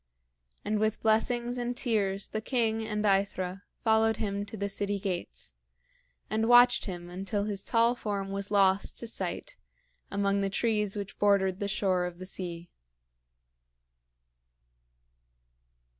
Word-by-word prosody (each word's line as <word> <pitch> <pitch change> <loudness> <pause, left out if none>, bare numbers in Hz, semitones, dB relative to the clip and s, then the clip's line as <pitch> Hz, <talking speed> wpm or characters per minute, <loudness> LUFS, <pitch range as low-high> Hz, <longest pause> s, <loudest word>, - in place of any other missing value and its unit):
And 210 0 0
with 215 0 0
blessings 240 +2 +1
and 245 0 -3
tears 200 -6 0
the 215 - -3
king 225 -2 0
and 210 -1 -2
AEthra 195 -1 0 0.2
followed 220 0 +3
him 200 -1 -3
to 220 - -8
the 200 0 -2
city 200 0 -1
gates, 185 - -4 0.7
and 220 +1 0
watched 245 0 +6
him 175 -3 -6
until 195 +3 -3
his 200 -2 -2
tall 230 +1 +3
form 200 -5 -4
was 200 0 -2
lost 195 -1 +3
to - - 0
sight - - -1 0.5
among 200 0 0
the 195 - 0
trees 210 0 +1
which 200 0 -6
bordered 195 -2 +3
the 200 - -1
shore 190 -3 +1
of 175 -1 -9
the 185 - -8
sea. 175 -2 -6
205 Hz, 135 wpm, -29 LUFS, 195-220 Hz, 0.7 s, watched